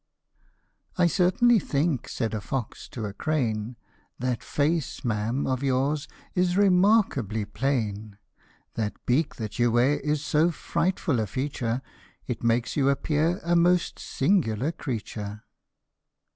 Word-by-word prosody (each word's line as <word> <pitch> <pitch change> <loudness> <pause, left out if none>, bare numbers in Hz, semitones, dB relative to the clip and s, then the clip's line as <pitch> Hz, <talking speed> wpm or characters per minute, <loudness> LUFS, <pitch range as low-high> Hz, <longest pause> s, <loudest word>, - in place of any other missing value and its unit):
" - - -40
I 180 - +4
CERTAINLY 195 +7 +4
think," 145 -4 -1
said 115 -3 -2
a 105 - -2
fox 125 0 -5
to 115 -4 -5
a 100 - -5
crane, 120 -5 -1 0.2
" - - -39
That 125 -2 -1
face, 150 0 -1
ma'am, 115 +4 0
of 130 -1 -1
yours 140 +2 0 0.3
is 180 0 +1
remarkably 185 - +3
plain; 105 -3 -2 0.6
That 110 -2 -2
beak 140 +5 +1
that 110 0 -6
you 120 -1 +3
wear 130 +5 +3
is 150 0 -1
so 155 +3 +3
frightful 165 -4 -1
a 110 - -1
feature, 130 0 -2 0.4
It 120 -3 -4
makes 115 +1 +1
you 140 -2 +3
appear 155 +6 +1
a 170 +1 +2
most 175 +1 +3
singular 135 - +1
creature." 105 -7 -5
135 Hz, 135 wpm, -26 LUFS, 115-165 Hz, 0.6 s, I